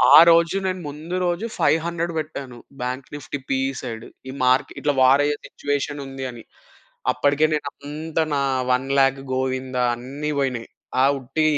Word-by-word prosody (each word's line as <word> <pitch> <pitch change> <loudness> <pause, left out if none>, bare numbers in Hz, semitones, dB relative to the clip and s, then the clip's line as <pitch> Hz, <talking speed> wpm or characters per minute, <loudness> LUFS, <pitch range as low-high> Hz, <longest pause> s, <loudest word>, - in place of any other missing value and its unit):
ఆరోజు 170 +3 +7
నేను 185 -1 -2
ముందు 155 +5 -6
రోజు 175 +5 0
500 170 +1 +1
బెట్టాను 140 -5 -6 0.2
బాంక్ 125 +1 -3
నిఫ్టీ 145 0 -5
పీఇ 135 0 +1
సైడ్. 115 -2 -6 0.2
ఈ - - -4
మార్క్ 130 +1 +3
ఇట్లా 145 - +2
వారయ్యే 145 +3 +4
సిట్యుయేషనుంది 140 -2 -3
అని. 120 -2 -11 0.7
అప్పడికే 145 +2 +3
నేనంతా 150 +2 -3
నా 140 - +1 0.3
1,00,000 135 +1 +2
గోవిందా 130 -1 -1
అన్నీ 135 +5 -5
వొయినయి. 125 -4 -2 0.3
ఆ - - +5
ఉట్టి 135 +5 -1
140 Hz, 130 wpm, -23 LUFS, 130-155 Hz, 0.7 s, ఆరోజు